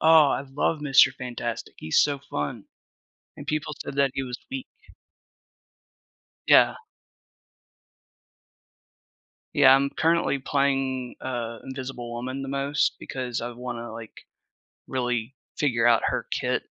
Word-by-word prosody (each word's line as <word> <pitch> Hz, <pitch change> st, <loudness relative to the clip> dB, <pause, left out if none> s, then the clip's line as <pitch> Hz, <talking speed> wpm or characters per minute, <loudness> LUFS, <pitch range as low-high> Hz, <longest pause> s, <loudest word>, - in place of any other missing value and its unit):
Oh, 160 Hz, -3 st, +7 dB
I -, -, 0 dB
love 140 Hz, +3 st, -1 dB
Mister 135 Hz, -2 st, +6 dB
Fantastic, 120 Hz, -4 st, -5 dB
he's 80 Hz, -, +2 dB
so 145 Hz, -1 st, +2 dB
fun. 75 Hz, -, -4 dB, 0.7 s
And 145 Hz, -, -8 dB
people 150 Hz, +1 st, -2 dB
said 140 Hz, -, -7 dB
that 140 Hz, -2 st, +3 dB
he 135 Hz, -, -1 dB
was 125 Hz, -2 st, -5 dB
weak. 265 Hz, -1 st, -6 dB, 1.8 s
Yeah. -, -, +6 dB, 2.8 s
Yeah, 135 Hz, -3 st, +8 dB
I'm 140 Hz, +1 st, +2 dB
currently 165 Hz, -3 st, +2 dB
playing, 135 Hz, -2 st, 0 dB
uh, 120 Hz, -3 st, -4 dB
Invisible 130 Hz, -3 st, -6 dB
Woman 130 Hz, +3 st, -4 dB
the 135 Hz, -, -5 dB
most, 140 Hz, +1 st, 0 dB
because 125 Hz, -3 st, -4 dB
I 120 Hz, -, -4 dB
wanna, 120 Hz, -1 st, -6 dB
like, 115 Hz, -1 st, -10 dB, 0.6 s
really 125 Hz, -1 st, -2 dB, 0.2 s
figure 120 Hz, -5 st, +2 dB
out 115 Hz, -1 st, +5 dB
her -, -, -1 dB
kit -, -, -1 dB
130 Hz, 120 wpm, -26 LUFS, 120-140 Hz, 2.8 s, Yeah